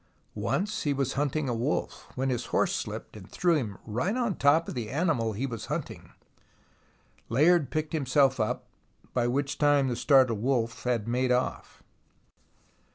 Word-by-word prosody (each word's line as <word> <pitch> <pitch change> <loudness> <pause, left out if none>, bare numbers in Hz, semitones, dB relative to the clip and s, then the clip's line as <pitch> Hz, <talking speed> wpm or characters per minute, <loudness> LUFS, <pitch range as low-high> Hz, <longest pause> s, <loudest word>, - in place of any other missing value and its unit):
Once 210 +3 -1
he 145 - 0
was 135 -1 -1
hunting 145 +1 -1
a 125 - 0
wolf, 120 +6 -3
when 130 +1 0
his 120 - -2
horse - - +1
slipped - - -5
and - - -11
threw 175 -1 +2
him 110 -10 -2
right 125 - -1
on 235 -5 0
top 155 +4 +3
of - - -4
the 115 -4 -4
animal 135 -8 0
he 120 +7 -2
was 115 -5 -6
hunting. - - -5 1.2
Layard 150 +4 +4
picked 155 +4 -3
himself 135 -3 +2
up, 110 - -1 0.5
by 120 -1 +1
which 140 +3 -1
time 145 -2 +3
the 120 - -1
startled 130 -6 +3
wolf 120 -2 -1
had 120 -3 0
made 125 +2 +1
off. 125 +1 -2
135 Hz, 160 wpm, -28 LUFS, 120-150 Hz, 1.2 s, Layard